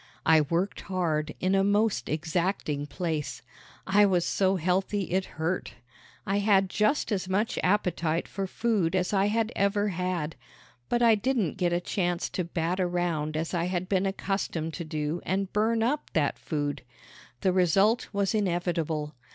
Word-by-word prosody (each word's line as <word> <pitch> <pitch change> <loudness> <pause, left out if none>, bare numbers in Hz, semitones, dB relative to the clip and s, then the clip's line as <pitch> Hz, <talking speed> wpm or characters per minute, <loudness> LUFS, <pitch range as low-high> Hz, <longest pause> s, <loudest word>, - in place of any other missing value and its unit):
I 160 -1 +6
worked 170 +7 -1
hard 160 -5 -1
in 185 +1 +1
a 195 0 +4
most 205 +2 +1
exacting 160 -2 -1
place. 150 -5 -3 0.4
I 200 +2 +4
was 180 -3 +2
so 190 0 +2
healthy 190 +3 0
it 190 +1 +1
hurt. 165 +3 -2 0.5
I 200 0 +1
had 195 -2 +3
just 215 +5 +1
as 190 -2 -1
much 205 +4 0
appetite 175 -4 +1
for 195 0 -4
food 200 -5 0
as 180 +1 0
I 195 0 +3
had 225 +1 0
ever 205 +1 +1
had; 180 -4 -2 0.5
but 240 0 +2
I 230 -1 +7
didn't 220 - 0
get 175 -2 +1
a 175 - +2
chance 175 -1 -1
to 180 - -2
bat 170 +2 -2
around 175 -4 -1
as 160 +3 -3
I 170 -1 0
had 180 0 -2
been 195 0 +1
accustomed 190 -4 -2
to 170 - -4
do 155 +1 -3
and 190 +1 -2
burn 225 +2 +2
up 290 +6 -1
that 150 -3 +1
food. 145 -2 -2 0.6
The 185 - +2
result 195 +6 +3
was 200 0 0
inevitable. 170 -6 -1
185 Hz, 160 wpm, -28 LUFS, 165-200 Hz, 0.6 s, I